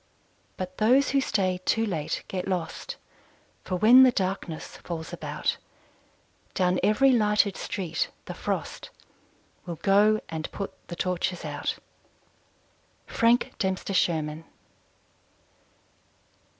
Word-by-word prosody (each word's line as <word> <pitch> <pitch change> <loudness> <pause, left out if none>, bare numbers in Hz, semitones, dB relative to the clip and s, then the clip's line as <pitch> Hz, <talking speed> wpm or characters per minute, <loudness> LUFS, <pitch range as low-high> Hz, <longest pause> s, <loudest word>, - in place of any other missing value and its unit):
But 185 0 -6
those 255 +6 +4
who 275 0 +3
stay 185 -7 0
too 225 +3 +1
late 165 -8 -3
get 185 0 -4
lost; 180 -4 -3 0.7
For 185 - -3
when 230 +7 +7
the 260 -1 +7
darkness 185 -6 -3
falls 165 -2 -6
about, - - -2 1.0
Down 180 -1 +2
every 265 +6 +4
lighted 210 -3 +3
street 175 -4 -3 0.2
the - - -6
frost - - -4 0.8
Will 170 - -4
go 205 +5 +4
and 160 -1 -5
put 200 - -5
the 175 - -6
torches 180 0 -2
out! - - -3 1.3
_Frank 235 +1 +2
Dempster 190 +1 -1
Sherman. 160 -3 0
190 Hz, 110 wpm, -27 LUFS, 175-215 Hz, 1.3 s, when